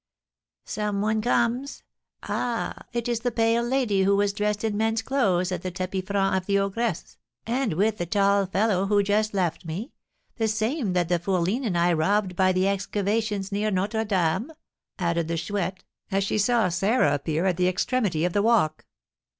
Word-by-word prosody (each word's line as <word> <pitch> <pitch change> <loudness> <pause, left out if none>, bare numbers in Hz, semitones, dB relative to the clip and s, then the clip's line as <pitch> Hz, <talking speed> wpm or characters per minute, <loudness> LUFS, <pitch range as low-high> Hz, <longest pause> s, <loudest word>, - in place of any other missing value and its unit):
Some 210 -1 -2
one 215 +1 +1
comes, 240 +3 0 0.4
ah, 240 -2 -3
it 240 0 -2
is 240 -2 0
the 245 +1 -1
pale 230 0 +2
lady 240 -5 +1
who 200 +1 +3
was 200 0 +1
dressed 210 0 -1
in 220 -2 0
men's 225 +1 0
clothes 190 -10 +1
at 180 -2 -3
the 185 - -3
tapis 185 +1 -4
franc 195 -1 +1
of 185 -1 -2
the 200 -1 +2
ogress, 200 -1 -2 0.3
and 240 -3 0
with 210 +5 +1
the 175 - -2
tall 200 +1 +2
fellow 195 0 +1
who 205 0 +3
just 210 +1 0
left 175 -4 -1
me, 180 - -5 0.5
the 225 -2 +1
same 220 - -1
that 175 -2 +1
the 175 0 +1
fourline 190 +7 0
and 180 -4 -1
I 175 +1 +3
robbed 185 +3 +1
by 185 +1 +3
the 185 +1 +1
excavations 200 +1 -1
near 205 +2 0
Notre 210 +3 0
Dame," 190 - 0 0.5
added 170 -3 0
the 165 0 -2
Chouette, 185 0 -3 0.3
as 195 +1 +1
she 200 - -1
saw 225 0 +3
Sarah 190 - +2
appear 155 +4 -1
at 180 -3 +1
the 180 0 +2
extremity 185 -3 0
of 175 - -1
the 205 - +2
walk. 210 -9 +2
200 Hz, 185 wpm, -25 LUFS, 185-220 Hz, 0.5 s, who